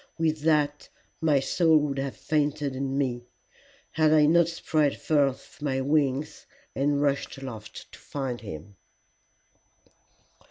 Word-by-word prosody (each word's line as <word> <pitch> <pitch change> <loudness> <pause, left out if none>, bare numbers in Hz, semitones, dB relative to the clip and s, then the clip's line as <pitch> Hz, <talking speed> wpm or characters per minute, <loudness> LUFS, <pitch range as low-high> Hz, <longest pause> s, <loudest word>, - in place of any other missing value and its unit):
With 160 -1 0
that 150 -1 +1 0.3
my 150 -3 +3
soul 160 +4 +3
would 145 -2 -1
have 135 -1 -3
fainted 145 -2 -1
in 135 0 -2
me, 120 -3 -2 0.6
had 155 -1 +3
I 155 -1 +6
not 170 +2 +4
spread 155 -3 0
forth 145 +1 0
my 135 -3 -1
wings 140 0 0 0.3
and 140 +1 +1
rushed 140 -1 -1
aloft 130 -6 -9
to - - -13
find 130 -4 -5
him. 95 0 -9
145 Hz, 125 wpm, -27 LUFS, 135-155 Hz, 0.6 s, I